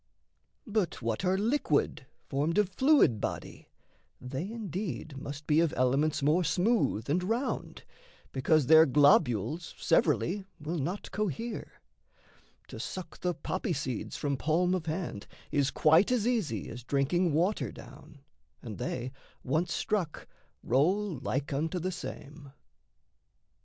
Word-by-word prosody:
But 210 -6 -1
what 115 - -1
are 185 0 +2
liquid, 205 - 0 0.2
formed 150 +6 0
Of 210 -3 +3
fluid 260 - +4
body, - - -5 0.5
they 135 +9 -5
indeed 190 -8 -5
must 140 +2 -7
be 150 0 +3
Of 165 -2 +2
elements 140 +4 +2
more 155 +5 +3
smooth 180 - +1
and 160 +6 +1
round 230 +8 -2 0.5
because 140 +2 +2
Their 160 +3 +7
globules 145 - +3
severally 180 +3 +2 0.2
will 155 +3 -3
not 175 +9 -4
cohere: 215 - -4 0.9
To - - -8
suck 180 -3 -6
the 180 -1 -1
poppy - - -2
seeds - - -4
from 140 -2 -1
palm 175 +6 +1
of 175 -3 -2
hand 155 - -4 0.2
Is 140 -2 +2
quite 160 - +4
as 240 -4 +1
easy 195 - -1
as 120 +1 -8
drinking 145 +7 +1
water 160 - +1
down, 140 +5 -13 0.4
And 110 -4 -7
they, 125 0 -3 0.3
once 160 +6 0
struck, 185 -6 -2 0.4
roll 170 - +1
like 135 +2 -2
unto 160 +6 -1
the 185 +2 -2
same. 145 -5 -8
160 Hz, 130 wpm, -30 LUFS, 140-185 Hz, 0.9 s, Their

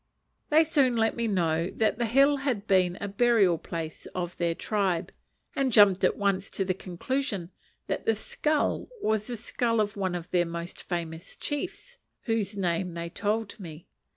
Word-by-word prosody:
They 310 +2 +6
soon 280 -6 +2
let 225 0 +2
me 235 -1 -1
know 170 -4 +1
that 220 0 +1
the 235 - +1
hill 275 +5 +5
had 255 -7 -2
been 185 -3 +3
a 200 - -3
burial 200 -5 +3
place 165 -2 -6
of 175 -1 -3
their 170 -1 0
tribe, 190 -5 -1 0.4
and 270 -2 +1
jumped 205 -4 +6
at - - +3
once 200 -1 0
to 195 - -2
the 185 - +1
conclusion 190 +1 -3 0.3
that - - -3
the 225 - +4
skull 300 +7 0 0.2
was 215 -1 +1
the 245 -2 -4
skull 230 +1 0
of 205 -1 0
one 190 -3 -1
of 175 -1 -6
their 175 -2 +2
most 170 +1 -6
famous 170 0 -4
chiefs; 400 - -5 0.2
whose 215 -3 -1
name 180 -1 -1
they 170 0 -4
told 215 +2 -2
me. 165 -3 -9
200 Hz, 175 wpm, -28 LUFS, 175-235 Hz, 0.4 s, They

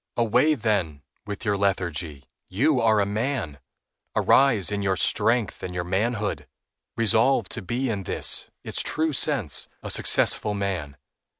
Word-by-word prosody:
Away, 120 +7 +3
then, 95 - -1 0.2
with 105 +2 -6
your 105 -1 +1
lethargy. 85 -7 -2 0.2
You 130 +8 +2
are 110 -2 +3
a 100 - +2
man; 105 - -3 0.6
arise 115 - +4
in 100 0 -2
your 95 -1 +1
strength 115 +4 0
and 90 -1 -6
your 90 - -2
manhood. 105 +4 -2 0.5
Resolve 115 0 +3
to - - -4
be 120 +7 -2
in 105 -4 -2
this, 95 - 0
its - - -1
true 160 0 -1
sense, 130 - 0 0.2
a - - -2
successful 105 -1 +2
man. 90 -8 -3
105 Hz, 140 wpm, -24 LUFS, 95-120 Hz, 0.6 s, arise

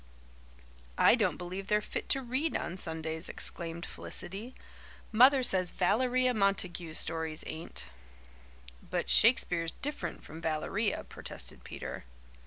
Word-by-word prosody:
"I - - +7
don't 210 -9 +2
believe 185 +2 -6
they're 210 0 +3
fit 210 - -6
to 270 - +2
read 260 +6 0
on 175 - -4
Sundays," 160 -2 -2
exclaimed 170 0 -1
Felicity. 215 +8 -7 0.6
"Mother 255 +4 +6
says 185 -6 +3
Valeria 250 +8 +2
Montague's 185 -6 0
stories 160 -1 -1
ain't." 160 - -5 1.0
"But - - -1
Shakespeare's 175 -8 +5
different 295 +2 -4
from 160 +2 -10
Valeria," 180 +7 -1
protested - - -7
Peter. - - -7
185 Hz, 115 wpm, -31 LUFS, 165-240 Hz, 1.0 s, I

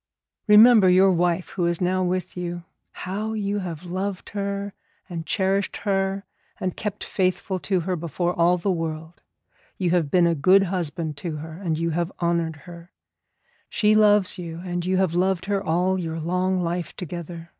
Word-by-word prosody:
Remember 210 -1 +8
your 190 +2 +5
wife 175 0 0
who 175 -3 -1
is 170 -1 0
now 185 +1 +1
with 185 0 -2
you; 175 -1 -4 0.3
how 210 +4 -4
you 205 -1 -1
have 175 -3 -6
loved 185 +2 -4
her 200 0 -3 0.3
and 170 -4 -6
cherished 195 0 0
her, 195 -1 -1 0.3
and 185 -1 -2
kept 210 -1 -4
faithful 185 0 -1
to 185 -1 0
her 185 +2 -2
before 175 +2 -2
all 175 +1 +3
the 190 +3 -1
world. 160 -1 -4 0.6
You 180 -3 0
have 170 -5 +1
been 175 +2 +4
a 170 - +3
good 185 +6 +5
husband 170 -4 -3
to 160 +1 -4
her, 155 +2 -7
and 165 -2 -3
you 165 +1 -1
have 170 +2 -1
honoured 170 -2 0
her. 170 0 -11 0.8
She 215 -1 +2
loves 210 -2 +4
you, 165 -1 -6
and 175 -1 -3
you 185 +1 0
have 185 -3 +1
loved 185 0 +1
her 200 -1 -1
all 185 +2 +1
your 165 -2 -4
long 180 +3 0
life 175 0 -3
together. 170 -1 -7
180 Hz, 175 wpm, -24 LUFS, 170-195 Hz, 0.8 s, Remember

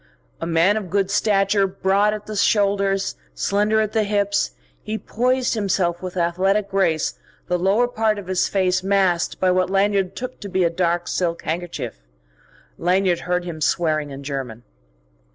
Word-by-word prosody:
A 165 - -2
man 170 +5 +3
of 200 -4 -5
good 195 +1 0
stature, 195 -1 +2
broad 195 +2 +1
at 210 -1 -5
the 215 - -6
shoulders, 200 - +1 0.2
slender 210 - +1
at 215 -1 -1
the 220 - +2
hips, 205 -1 0 0.3
he 215 +1 -4
poised 250 +3 0
himself 185 -5 0
with 185 0 -6
athletic 190 +4 +1
grace 170 -5 0 0.3
the 180 - 0
lower 200 +7 +3
part 220 -3 0
of 205 - -7
his 185 0 +1
face 185 -2 +1
masked 190 -3 +1
by 185 -1 +3
what 185 0 +1
Lanyard 195 -1 +1
took 255 +1 -6
to 200 - -7
be 185 -1 +1
a 170 - +2
dark 175 0 0
silk 170 -2 -1
handkerchief. 160 - -4 0.8
Lanyard 180 0 +2
heard 180 0 -1
him 165 -3 -6
swearing 155 -2 +1
in 140 0 -8
German. 130 -5 -5
190 Hz, 165 wpm, -22 LUFS, 175-205 Hz, 0.8 s, man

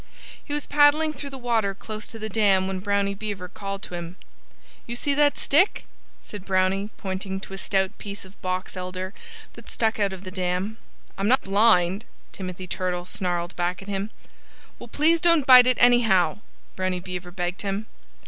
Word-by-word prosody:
He - - -10
was 295 0 -1
paddling 295 +2 +4
through 280 0 -7
the 270 - -8
water 225 -6 0
close 215 +1 -7
to 225 - -9
the 220 0 -4
dam 200 -3 +3
when 190 0 -3
Brownie 200 0 0
Beaver 200 -3 -5
called 195 +1 -6
to - - -7
him. 175 0 -6 0.7
"You 235 - -4
see 285 +4 0
that 290 0 +3
stick??" 345 +8 +2 0.4
said 205 -3 -8
Brownie, 190 +1 +1
pointing 190 0 -4
to 195 - -10
a - - -5
stout 190 -1 0
piece 200 -1 -7
of 190 +1 -18
box 185 +1 -3
elder 185 +1 -5 0.4
that - - -13
stuck 220 -1 0
out 200 -1 +2
of 190 0 -8
the 185 - -7
dam. 185 +3 -2 0.4
"I'm 195 - +1
not 260 +3 +4
blind," 195 -1 +3 0.3
Timothy 185 -1 -6
Turtle 180 0 -2
snarled 175 -2 -3
back 175 +2 -2
at - - -15
him. 200 +1 -3 0.7
"Well, 240 - -9
please 320 +7 +2
don't 335 -5 +4
bite 255 -1 +9
it, 255 - +3
anyhow!" 220 -9 +4 0.4
Brownie 185 -1 -1
Beaver 180 0 -6
begged 175 0 -3
him. 200 +1 -3
195 Hz, 180 wpm, -25 LUFS, 185-230 Hz, 0.7 s, bite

